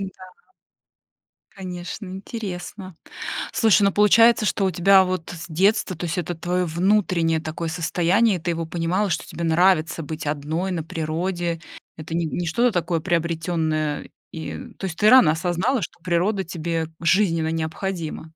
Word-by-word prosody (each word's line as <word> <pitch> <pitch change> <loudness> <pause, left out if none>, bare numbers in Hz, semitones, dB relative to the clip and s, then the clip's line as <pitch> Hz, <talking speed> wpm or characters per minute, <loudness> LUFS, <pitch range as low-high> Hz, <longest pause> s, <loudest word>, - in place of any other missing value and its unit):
Н-да. 185 -1 -8 1.2
Конечно, 180 +1 -7
интересно. 190 -2 -7 0.6
Слушай, 220 -2 +4
ну, 200 - +4
получается, 220 +3 +5
что 200 -1 +1
у 190 - +1
тебя 190 +2 +5
вот 185 -3 -3
с 165 0 -8
детства, 185 +3 +1
то 175 +2 -5
есть 165 - -3
это 175 0 -2
твоё 180 +2 -1
внутреннее 170 -2 +1
такое 160 +1 -4
состояние, 180 +5 +2
и - - -9
ты 175 +2 -2
его 165 -1 -3
понимала, 175 +5 -1
что 160 - -2
тебе 170 - -6
нравится 165 0 +2
быть 155 0 -6
одной 155 +6 -2
на 165 -3 -2
природе, 165 +2 -2 0.4
это 160 +1 -6
не 170 - 0
не 170 +2 -3
что-то 235 +8 +2
такое 175 -2 0
приобретённое, 160 -3 -1 0.2
и, 160 -1 -6
э, - - -6 0.2
то - - -5
есть 175 -3 -5
ты 210 - +5
рано 255 -12 +7
осознала, 180 +9 0
что 165 - -7
природа 185 +4 +1
тебе 165 -2 -3
жизненно 165 -3 +2
необходима. 165 0 -4
175 Hz, 155 wpm, -23 LUFS, 165-190 Hz, 1.2 s, рано